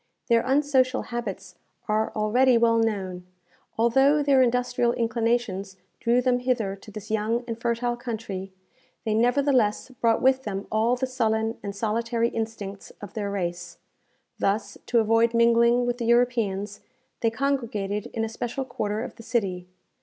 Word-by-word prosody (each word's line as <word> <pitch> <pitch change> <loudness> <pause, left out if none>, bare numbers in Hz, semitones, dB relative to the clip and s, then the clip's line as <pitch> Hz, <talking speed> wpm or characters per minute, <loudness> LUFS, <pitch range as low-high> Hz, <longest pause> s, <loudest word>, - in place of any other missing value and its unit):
Their 230 -1 +5
unsocial 265 -1 +2
habits 195 -6 -5 0.3
are 215 +1 +1
already 240 +4 +3
well 230 0 +3
known. 190 -5 -2 0.5
Although 270 +6 +4
their 275 -2 +4
industrial 245 -1 +1
inclinations 230 -5 -1 0.2
drew 240 +1 +2
them 250 -1 +2
hither 240 -6 -1
to 200 - -14
this 210 0 -9
young 220 +3 0
and 230 -1 -5
fertile 240 +1 0
country, 220 -6 -5 0.5
they 220 - 0
nevertheless 245 -1 +2
brought 230 -2 +1
with 265 0 +3
them 200 -4 -4
all 225 +3 +2
the 255 +1 -1
sullen 225 -3 -1
and 200 -1 -6
solitary 230 +2 0
instincts 220 -4 -5
of 205 - -9
their 205 -2 -3
race. 175 -3 -4 0.6
Thus, 200 +3 0
to 240 - +1
avoid 225 +1 +3
mingling 235 +1 +4
with 245 0 -2
the 235 - -2
Europeans, 225 -4 +1 0.4
they 230 - +2
congregated 225 -5 -2
in 225 -1 -3
a - - -3
special 240 +4 -4
quarter 215 -3 -3
of - - -8
the - - -10
city. 195 -7 -2
230 Hz, 150 wpm, -25 LUFS, 210-245 Hz, 0.6 s, Their